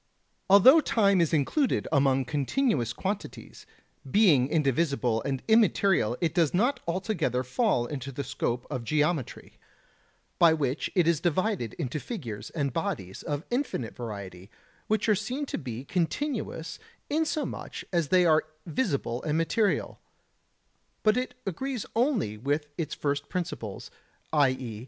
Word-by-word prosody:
Although 230 - +8
time 200 - +3
is 165 - +1
included 170 - +1
among 135 -3 +3
continuous 145 - 0
quantities, 195 +1 -6 0.4
being 155 - +5
indivisible 140 -5 +1
and 135 +1 -3
immaterial 200 - +3
it 165 -3 +1
does 170 -2 +2
not 245 +7 +2
altogether 170 - -1
fall 130 - +1
into 135 0 -5
the 140 +2 -4
scope 120 -2 -2
of 130 -4 -3
geometry, 150 +2 -1 0.8
by 170 -2 +7
which 140 -2 -1
it 175 -3 +3
is 170 -3 +3
divided 175 - 0
into 150 -2 -3
figures 115 - -6
and 140 -5 -2
bodies 160 - -3
of 145 +3 -4
infinite 245 - -2
variety, 100 -5 -7 0.4
which 215 +1 +1
are 215 - +5
seen 245 +8 -2
to - - -4
be 125 -3 -6
continuous 185 - -2 0.3
inasmuch 310 0 -2
as 170 -4 +1
they 180 +4 +4
are 155 -2 +4 0.2
visible 150 - -1
and 155 0 -1
material, 200 +6 0 1.0
but 215 0 +4
it 250 0 -2
agrees 250 +6 -3
only 230 - +1
with 145 +6 -1
its 165 -1 -3
first 145 0 -2
principles, 160 - -5 0.4
i.e. 130 -7 +1
160 Hz, 135 wpm, -28 LUFS, 130-205 Hz, 1.0 s, Although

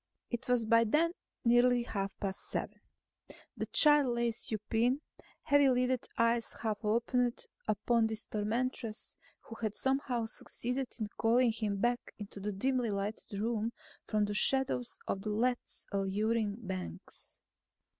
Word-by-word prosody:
It 240 - -3
was 245 -2 +2
by 230 +1 +5
then 305 +9 +3 0.3
nearly 240 +1 +5
half 195 -4 -4
past 195 -1 -4
seven. - - -4 0.7
The - - -3
child 295 -2 +6
lay 235 0 +1
supine; 225 +3 0 0.4
heavy 285 -2 +5
lidded 250 0 +1
eyes 230 0 +2
half 215 -1 -3
opened 235 +3 +1 0.2
upon 220 +2 +2
this 220 0 -2
tormentress 225 +1 -2 0.3
who 225 - -10
had 215 -2 -1
somehow 265 -3 0
succeeded 250 +3 -3
in 215 - -1
calling 235 +1 +4
him 215 -2 -2
back 240 +4 -1
into 205 -1 -7
the 210 +2 -2
dimly 250 +4 0
lighted 200 0 -3
room 225 +1 -1 0.3
from 210 -1 +2
the 205 - -3
shadows 260 +1 +2
of 195 - -2
Lethe's 235 +4 -1
alluring 205 +2 0
banks. 185 - -7
230 Hz, 135 wpm, -33 LUFS, 210-245 Hz, 0.7 s, child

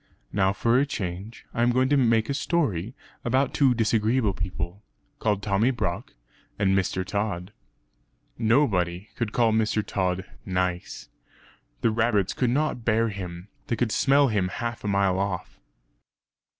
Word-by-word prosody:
Now, 95 -1 +3
for 115 +5 +2
a 140 - +3
change, 100 -1 -5
I 115 - -1
am 120 - +4
going 130 +2 +3
to 145 - +4
make 115 -4 +3
a 140 - -1
story 135 - -1 0.3
about 130 +3 +1
two 135 -4 +4
disagreeable 110 -1 +2
people, 90 +1 -5 0.4
called 105 -2 0
Tommy 105 +4 +2
Brock 110 - -3 0.4
and 95 -2 +2
Mr. 95 -1 0
Tod. 100 -1 -3 0.8
Nobody 105 -6 +1
could 115 -3 -2
call 115 -1 +3
Mr. 110 -1 +1
Tod 95 -1 -1 0.2
"nice." 90 -1 -2 0.7
The 115 - +3
rabbits 110 -4 +1
could 125 - +1
not 140 -2 0
bear 115 0 +2
him; 90 -2 -7 0.2
they 120 - 0
could 115 0 0
smell 140 +2 +4
him 100 -4 +1
half 115 +5 -4
a - - -3
mile 100 -2 +2
off. 100 -2 -3
110 Hz, 150 wpm, -26 LUFS, 95-120 Hz, 0.8 s, am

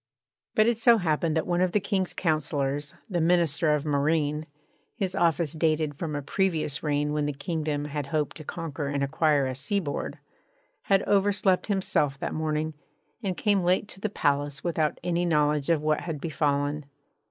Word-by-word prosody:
But 215 - +5
it 235 -1 +1
so 235 0 +6
happened 160 -3 0
that 160 - 0
one 175 0 +1
of 185 -1 +1
the 210 - +4
King's 195 -2 -1
councillors, 145 -3 -1
the 175 -6 -1
Minister 165 -2 +3
of 150 0 -3
Marine 150 +1 +1 0.5
(his 190 -3 -2
office 170 -4 +1
dated 155 -2 +1
from 150 +1 -4
a 145 - -3
previous 160 -3 0
reign 150 -1 0
when 150 -1 0
the 145 - -2
kingdom 150 0 -2
had 145 -1 -4
hoped 150 -1 -1
to 155 - -9
conquer 155 -2 -4
and 140 0 -1
acquire 145 0 +2
a 130 - -2
seaboard) 145 +3 -2 0.7
had 195 0 +3
overslept 195 -2 +2
himself 185 -8 +1
that - - -3
morning 155 0 -1 0.5
and 190 -5 -2
came 205 -2 +2
late 180 +3 +2
to - - -9
the 215 - -2
palace 145 -5 0
without 160 -3 0
any 175 0 0
knowledge 150 -3 +2
of 160 -3 +2
what 155 0 +1
had 165 -4 -4
befallen. 145 -1 -1
155 Hz, 175 wpm, -27 LUFS, 145-175 Hz, 0.7 s, so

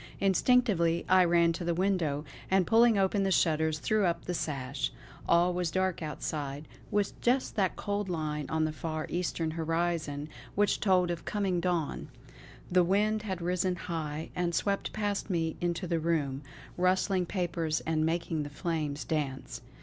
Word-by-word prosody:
Instinctively 195 -4 +3
I 185 0 +6
ran 170 -1 +4
to 170 - -5
the 170 0 0
window, 170 -6 0 0.2
and 190 -1 +3
pulling 230 +1 +5
open 195 +1 +2
the 195 - +1
shutters, 160 -3 +2
threw 215 +7 +1
up 170 0 -2
the 180 - -2
sash. 135 -4 -2 0.4
All 175 +1 +4
was 180 -1 -1
dark 185 +1 0
outside, 150 -1 -4 0.2
with 205 -1 -1
just 255 +2 +1
that 190 -3 +1
cold 205 -1 -2
line 150 -4 -2
on 160 0 +1
the 155 - -1
far 155 0 -4
Eastern 170 -2 -1
horizon 165 -2 -1 0.3
which 205 0 +2
told 180 -3 +3
of 170 - -4
coming 195 -4 0
dawn. 170 -3 -1 0.6
The 180 0 +5
wind 210 +4 +2
had 190 -5 -4
risen 180 +1 0
high, 160 -3 -4
and 175 -1 0
swept 200 +3 0
past 205 -1 -2
me 165 -3 0
into 175 +1 -1
the 170 -1 0
room, 150 -5 0 0.4
rustling 185 0 +2
papers 170 -4 -1
and 160 -1 0
making 165 -1 -1
the 145 - -4
flames 150 -2 -2
dance. 140 -4 -3
170 Hz, 160 wpm, -30 LUFS, 155-190 Hz, 0.6 s, I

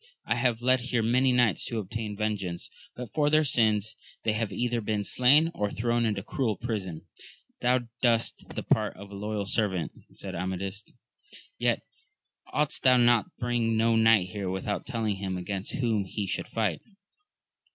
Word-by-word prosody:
I - - +1
have 120 -1 0
led 130 +1 +4
here 120 -2 0
many 125 +3 +3
knights 120 -5 +3
to 115 - -3
obtain 110 0 -4
vengeance, 100 -5 -3 0.2
but 120 -4 -8
for 150 -1 +2
their 155 +1 +4
sins 110 -5 +1 0.3
they 110 - +1
have 110 -1 -2
either 120 -1 -1
been 105 -1 -1
slain 140 +10 +4
or 105 -7 -1
thrown 120 +2 0
into 100 -3 -2
cruel 110 -4 -1
prison. 100 -9 -4 0.5
Thou 125 +1 +2 0.2
dbest 115 -2 +1
the - - -3
part - - +1
of 100 +1 -11
a - - -8
loyal 105 0 -3
servant, 95 -4 0 0.2
said 95 - -7
Amadis; 95 +3 -3 0.7
yet - - +1 0.7
oughtest 150 -1 0
thou 130 -1 +6
to 120 -3 +4
bring 120 -2 0
no 115 +1 +3
knight 110 -5 +4
here 100 -1 -3
without 95 +2 -3
telling 110 -6 -1
him 95 -1 -3
against 95 +2 -4
whom 115 -6 0
he 100 +2 -3
should 95 - -3
fight. 110 -2 -1
110 Hz, 165 wpm, -28 LUFS, 100-120 Hz, 0.7 s, thou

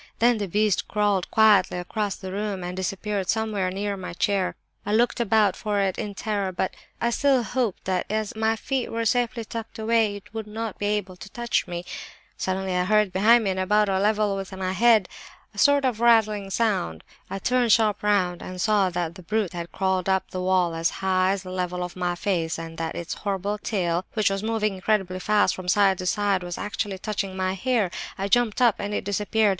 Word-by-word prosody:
Then 235 -1 +3
the 200 - -2
beast 210 +1 +1
crawled 205 -3 +1
quietly 210 -5 +4
across 200 +3 -2
the 190 -1 -7
room 200 -1 -3
and 180 0 -4
disappeared 195 +1 -3
somewhere 215 -4 0
near 200 +2 -2
my 185 -3 -7
chair. 190 +1 0 0.3
I 205 - -2
looked 240 +2 +2
about 215 -4 +3
for 210 -2 -1
it 195 -2 0
in 210 -3 -4
terror, 200 -2 -2
but 185 +1 -2 0.3
I 235 - +1
still 270 0 +3
hoped 230 -1 -2
that 185 -1 -1
as 215 0 -2
my 220 0 +1
feet 260 +3 -2
were 230 0 -2
safely 235 0 0
tucked 225 0 -7
away 220 -1 +2
it 205 +3 -12
would 220 -1 -5
not 220 0 -5
be 205 - -1
able 205 -3 -2
to 195 - -10
touch 235 -3 -1
me. 175 0 -5 0.5
"Suddenly 190 0 -2
I 180 0 +1
heard 210 -1 +2
behind 225 +5 +5
me, 195 - +1
and 190 - -3
about 210 +2 +2
on 190 -1 +1
a - - 0
level 210 -1 +2
with 195 -1 -5
my 185 -1 -2
head, 220 0 +4 0.5
a 205 - -8
sort 285 +1 +4
of 245 -4 0
rattling 215 -4 +3
sound. 195 - -1 0.3
I - - -3
turned 245 +3 +1
sharp 215 -2 +3
round 190 -4 +1
and 185 0 -7
saw 205 -1 +3
that 175 -2 -3
the 185 - -12
brute 210 +1 -1
had 170 -1 -6
crawled 190 -1 0
up 190 0 0
the 185 - -3
wall 180 -2 +2
as 165 +1 +1 0.2
high 185 0 +3
as 195 -1 -4
the 185 - -8
level 180 -1 -2
of 180 - -6
my 180 -1 -1
face, 175 -4 -1
and 165 0 -7
that 165 -1 -3
its 170 - -4
horrible 200 +1 -2
tail, 180 -4 -1
which 215 -2 +2
was 195 0 -2
moving 215 -1 0
incredibly 190 -1 0
fast 205 -1 +2
from 185 -1 -8
side 195 0 +3
to 185 - -3
side, 200 0 +1
was 175 -1 -5
actually 205 -1 -3
touching 195 -1 -3
my 185 0 0
hair! 215 -1 0 0.3
I 195 - -2
jumped 245 +1 +2
up—and 205 -3 +2
it - - -2
disappeared. 210 +2 +1
200 Hz, 215 wpm, -25 LUFS, 185-215 Hz, 0.5 s, behind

